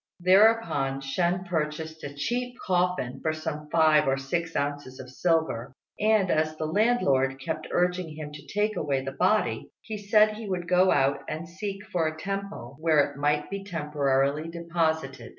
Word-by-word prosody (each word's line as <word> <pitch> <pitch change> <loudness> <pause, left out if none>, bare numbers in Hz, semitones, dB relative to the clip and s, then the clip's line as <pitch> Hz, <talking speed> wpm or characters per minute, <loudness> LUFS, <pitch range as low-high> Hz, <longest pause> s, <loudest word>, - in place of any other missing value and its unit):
Thereupon 185 -8 +3
Shên 175 +6 -1
purchased 160 -1 -3
a 140 - -5
cheap 245 +10 -2
coffin 180 -8 0
for 155 - 0
some 155 -1 -5
five 155 -3 +4
or 135 0 +2
six 165 +5 -3
ounces 140 -2 -3
of 130 -1 -9
silver; 150 -6 0 0.3
and, 210 -3 +3
as 155 0 0
the 155 - -2
landlord 155 - +2
kept 155 +2 -4
urging 180 -3 0
him 150 -1 -7
to 150 - -11
take 210 +1 0
away 135 -3 -1
the 135 - -3
body, 185 +10 +1
he 215 -2 -6
said 210 +1 +4
he 220 -2 -7
would 180 -2 -3
go 180 +1 +4
out 140 0 +2
and 160 +2 -5
seek 195 +3 -6
for 175 -6 0
a 155 0 -4
temple 195 -8 -5
where 155 -3 +3
it - - -14
might 150 +2 0
be 200 0 -4
temporarily 150 -3 0
deposited. 165 -1 -2
160 Hz, 170 wpm, -27 LUFS, 145-185 Hz, 0.3 s, five